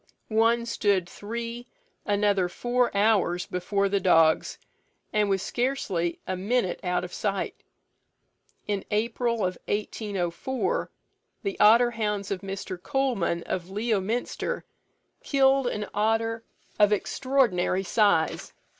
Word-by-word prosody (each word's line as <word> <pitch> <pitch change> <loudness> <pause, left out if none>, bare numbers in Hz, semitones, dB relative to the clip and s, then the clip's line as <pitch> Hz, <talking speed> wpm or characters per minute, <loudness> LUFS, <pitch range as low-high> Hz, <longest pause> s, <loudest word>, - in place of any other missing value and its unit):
One 230 +2 +3
stood 200 -6 +1
three, 235 +5 -6 0.4
another 205 -3 +2
four 245 +5 +1
hours 200 -4 +2
before 200 +2 0
the 200 0 +1
dogs, 165 -4 +3 0.6
and 210 -1 +2
was 195 -1 +1
scarcely 200 -10 -1
a 185 - -2
minute 195 0 0
out 180 -1 0
of 180 - -7
sight. 200 -2 -2 1.1
In 205 -2 -1
April 230 +2 0
1804, 205 - -2 0.5
the 395 - -3
otter 235 +3 +6
hounds 210 -3 -2
of 190 -2 -2
Mr. 195 -2 -6
Coleman, 215 -10 0
of 180 0 -4
Leominster, 215 +2 -2 0.6
killed 270 -2 +3
an 210 -3 -2
otter 225 +2 0 0.4
of 210 0 +5
extraordinary 210 -5 +1
size. 200 -5 +1
210 Hz, 110 wpm, -26 LUFS, 185-235 Hz, 1.1 s, otter